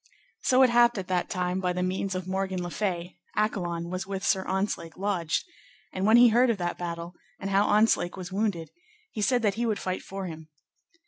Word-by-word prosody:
So 260 0 +4
it 255 - +5
happed 240 -1 +5
at 190 -2 -4
that 180 -1 0
time, 180 0 -1
by 180 -1 0
the 180 0 -1
means 185 +1 -2
of 185 0 -4
Morgan 190 -1 -2
le 175 - -5
Fay, 180 -4 -3 0.2
Accolon 175 -5 -1
was 185 +1 -4
with 195 -1 -4
Sir 190 - +2
Ontzlake 190 -4 -2
lodged; 185 -5 -1 0.5
and 190 +2 0
when 220 +2 +7
he 240 0 +8
heard 240 +3 +4
of 230 - +1
that 175 -2 -3
battle, 170 0 -5 0.3
and 195 0 -4
how 200 +1 +3
Ontzlake 210 -4 +3
was 185 0 -7
wounded, 195 -5 -1 0.4
he 215 - -4
said 245 +2 +2
that 205 -2 +3
he - - +1
would 215 -2 0
fight 185 0 -3
for 195 0 -6
him. 160 -2 -8
190 Hz, 210 wpm, -27 LUFS, 180-210 Hz, 0.5 s, he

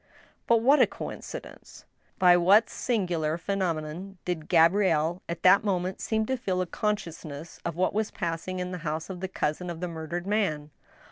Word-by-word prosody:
But 230 -1 +4
what 280 +4 +6
a - - +6
coincidence! - - -9 0.3
By 180 -2 +6
what 195 +6 +5
singular 175 -9 -1
phenomenon 180 0 -3
did 165 -3 -3
Gabrielle 170 -1 +3
at 170 - -5
that 185 +3 +6
moment 185 -2 -1
seem 220 -1 0
to 260 +3 -1
feel 190 -7 -2
a 185 - +1
consciousness 165 -6 -4
of 170 -2 -3
what 185 +1 +1
was 215 +1 0
passing 170 +1 -4
in 180 0 -3
the 180 - -5
house 155 +2 -4
of 180 - -7
the 190 - -3
cousin 180 -1 -2
of 170 -1 -5
the 180 - -3
murdered 170 +1 -5
man 185 -8 -1
180 Hz, 175 wpm, -27 LUFS, 165-195 Hz, 0.3 s, what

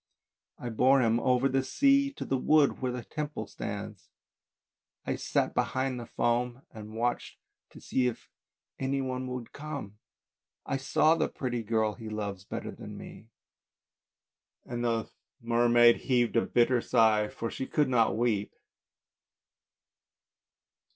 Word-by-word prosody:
" - - -64
I - - -2
bore 130 +4 +4
him 115 0 +2
over 125 +2 +2
the 135 0 +1
sea 275 - +3
to - - -6
the 135 - 0
wood, 150 0 +3
where 130 -1 0
the 125 -1 -5
Temple 150 -1 -5
stands. - - -7 1.0
I - - -1
sat - - 0
behind 130 -1 -1
the 120 - -8
foam 120 +2 -1
and 110 0 -10
watched 120 +2 -2 0.3
to - - -14
see 130 -1 0
if 120 - -5 0.5
any 135 +1 0
one 130 -1 -3
would 125 -2 -6
come. 140 -9 -7 0.7
I - - -1
saw 155 +4 +3
the 165 -1 0
pretty 120 -3 -3
girl 110 -1 0
he 110 -1 -8
loves 100 -3 -4
better - - -5
than - - -9
me." 110 - -11 1.4
And 120 0 -4
the 115 -1 0 0.3
mermaid 120 0 +5
heaved 120 -3 +1
a 115 - +2
bitter 120 0 +3
sigh, 110 -3 +3
for 115 +2 -5
she 130 - -4
could 150 -2 +1
not 115 -4 +2
weep. 110 -4 0
120 Hz, 145 wpm, -29 LUFS, 115-130 Hz, 1.4 s, mermaid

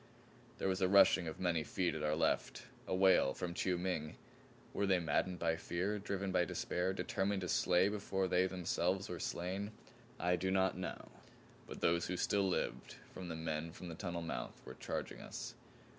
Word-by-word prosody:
There - - -1
was 95 -1 0
a 95 - +4
rushing 95 -2 +6
of 80 - -5
many 85 -3 +1
feet 90 +2 0
at 80 - -4
our 75 0 +1
left; 80 - 0 0.2
a - - 0
wail 95 -8 +5
from 85 -1 -3
Chiu 90 0 0
Ming. 85 -4 -2 0.6
Were 100 - +1
they 95 -1 +4
maddened 90 +1 0
by 80 -1 +1
fear, 90 +5 -1
driven 100 -1 -2
by 90 - +3
despair, 90 +2 -1
determined 95 +1 -1
to 90 - -3
slay 90 +1 +4
before 100 -2 -1
they 90 +1 +3
themselves 95 +2 -1
were 90 - -4
slain? 95 +6 -2 0.5
I 90 0 +2
do 95 +2 -1
not 95 0 +2
know. 95 - -5 0.6
But - - -8
those 85 0 +2
who 90 - -2
still 100 0 +2
lived - - -2 0.2
of 95 - -6
the 85 - -4
men 80 0 -3
from 90 - -8
the - - -5
tunnel 85 -2 -4
mouth 80 - -4
were 65 - -7
charging - - -4
us. - - -6
90 Hz, 190 wpm, -36 LUFS, 85-95 Hz, 0.6 s, rushing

